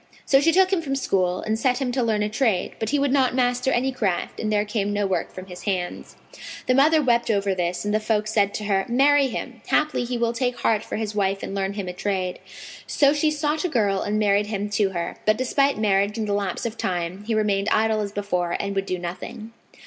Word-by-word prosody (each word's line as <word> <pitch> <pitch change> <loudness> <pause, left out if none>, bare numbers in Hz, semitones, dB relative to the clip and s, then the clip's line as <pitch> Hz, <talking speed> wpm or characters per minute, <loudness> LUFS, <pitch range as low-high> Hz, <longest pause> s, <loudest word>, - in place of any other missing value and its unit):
So 270 0 +4
she 330 +3 +4
took 375 +2 +4
him 360 - +2
from 275 -4 -2
school 185 -8 0
and 220 +1 -2
set 250 +1 +2
him 260 -3 -1
to 255 +1 0
learn 220 -3 +1
a - - 0
trade; 220 -4 0
but 220 - -2
he 290 - +1
would 280 -1 +1
not 260 -3 +2
master 250 0 +1
any 260 +2 +1
craft 205 -9 -2
and 215 - -1
there 210 0 +2
came 205 -1 -1
no 205 0 0
work 190 -1 -1
from 185 - -9
his 180 -1 -10
hands. 185 -3 -3 0.5
The 255 - +2
mother 300 +4 +4
wept 235 -2 +2
over 200 -2 +1
this 180 +1 -2
and 210 - -1
the 215 - +3
folk 215 -1 0
said 205 -2 +2
to 215 - -4
her, 195 -2 +1
"Marry 275 +3 +4
him: 255 - -6
haply 305 -4 +1
he 245 0 -3
will 235 0 0
take 245 +1 -2
heart 215 -2 +2
for - - -5
his 215 -1 -3
wife 195 -1 0
and - - -5
learn 195 0 -1
him 200 -2 -5
a 180 - -4
trade." 185 -1 -2 0.5
So 280 -1 +3
she 305 +1 +2
sought 300 0 -1
out - - -2
a - - 0
girl 205 -8 +1
and 210 +1 -1
married 205 -1 +2
him 205 -1 -3
to 205 -1 +2
her; 170 -2 -4
but, 215 0 +4
despite 275 +2 +1
marriage 205 0 +1
and 220 -1 -2
the 205 - 0
lapse 200 0 -2
of 230 -1 -4
time, 180 +1 -2
he 225 0 -1
remained 210 -1 +1
idle 220 0 +2
as 200 -1 -4
before, 180 -4 -1
and 200 0 -2
would 195 0 -2
do 185 - -1
nothing. 185 +6 -7
215 Hz, 250 wpm, -23 LUFS, 195-250 Hz, 0.5 s, So